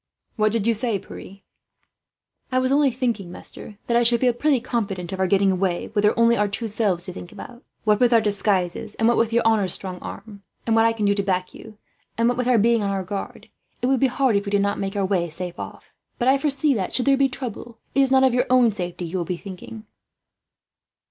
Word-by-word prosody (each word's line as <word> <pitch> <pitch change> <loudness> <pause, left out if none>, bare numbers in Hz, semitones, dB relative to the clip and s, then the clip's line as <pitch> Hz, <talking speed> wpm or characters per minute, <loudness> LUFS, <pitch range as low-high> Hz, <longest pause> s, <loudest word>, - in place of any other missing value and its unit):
"What 215 -1 +2
do 230 - +1
you 230 +2 +1
say, 225 -1 0
Pierre?" 195 +1 -11 1.1
"I 255 - +1
was 255 0 +1
only 285 0 +4
saying, 235 -7 -2
master, 205 +3 -9
that 235 - 0
I 240 - +5
should 235 0 +4
feel 250 -1 +2
pretty 280 +2 +1
confident 195 -7 -3
of 190 - -5
our 190 - +2
getting 195 0 +3
away, 185 -1 -1
were 205 - +2
there 210 +2 +2
only 230 0 +4
our 210 -1 +1
two 215 +3 -4
selves 200 -5 0
to 185 - -6
think 175 -1 -9
of. 240 0 -11 0.2
What 210 -1 +2
with 245 -1 +4
our 230 - +6
disguises, 205 -1 -1
and 225 - +1
what 240 - +4
with 230 0 +1
your 235 +1 +2
honour's 215 -5 +2
strong 185 -2 -5
arm 200 -1 -9 0.2
and 225 - +1
what 225 0 +4
I 230 - +3
can 215 -2 -2
do 200 - +3
to 200 - 0
back 185 -2 -2
you 215 -1 -13 0.4
and 230 0 +2
what 245 - +1
with 250 - 0
our 250 -2 +4
being 230 +1 +3
on 200 - -1
our 195 -1 -2
guard, 195 +2 -7 0.3
it - - +3
would 265 0 +2
be 270 - +4
hard 255 -2 +1
if 200 +1 0
we - - -1
did 200 0 +2
not 200 0 -1
make 195 +1 -3
our 200 -1 0
way 180 -3 0
safe 175 +2 -6
off. - - -9 0.2
But 245 - -1
I 270 +1 +4
foresee 290 0 +1
that, 195 -6 -3
should 250 - 0
there 275 0 +5
be 270 0 +2
trouble, 240 -2 -7 0.2
it - - +1
is 270 - +3
not 265 0 +4
of 260 -2 +4
your 250 +1 +1
own 250 -2 +5
safety 180 -3 -4
you 175 +3 -3
will - - -1
be 180 0 -3
thinking." 200 +4 -10
215 Hz, 250 wpm, -23 LUFS, 195-240 Hz, 1.1 s, our